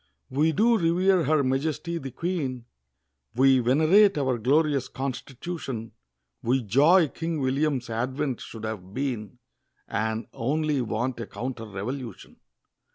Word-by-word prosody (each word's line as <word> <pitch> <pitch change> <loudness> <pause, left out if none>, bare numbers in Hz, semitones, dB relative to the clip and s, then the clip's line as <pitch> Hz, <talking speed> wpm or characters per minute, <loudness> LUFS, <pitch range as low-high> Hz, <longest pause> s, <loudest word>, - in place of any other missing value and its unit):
We 150 +5 +2
do 225 +6 +3
revere 180 +1 +3
Her 150 0 +3
Majesty 155 +6 -1
the 135 - -6
Queen, 135 -5 -3 0.7
We 135 +1 +5
venerate 160 - +4
our 130 -4 0
Glorious 140 +2 +2
Constitution; 130 -1 -5 0.5
We 125 +2 +1
joy 150 - +5
King 165 +1 -3
William's 135 -1 0
advent 125 +3 -2
should 110 -1 -9
have 100 -3 -6
been, 125 -5 -3 0.5
And 110 +2 -2
only 150 +3 0
want 120 +2 -2
a 115 - -5
Counter 120 -2 -5
Revolution. 110 +3 -6
135 Hz, 120 wpm, -26 LUFS, 120-155 Hz, 0.7 s, We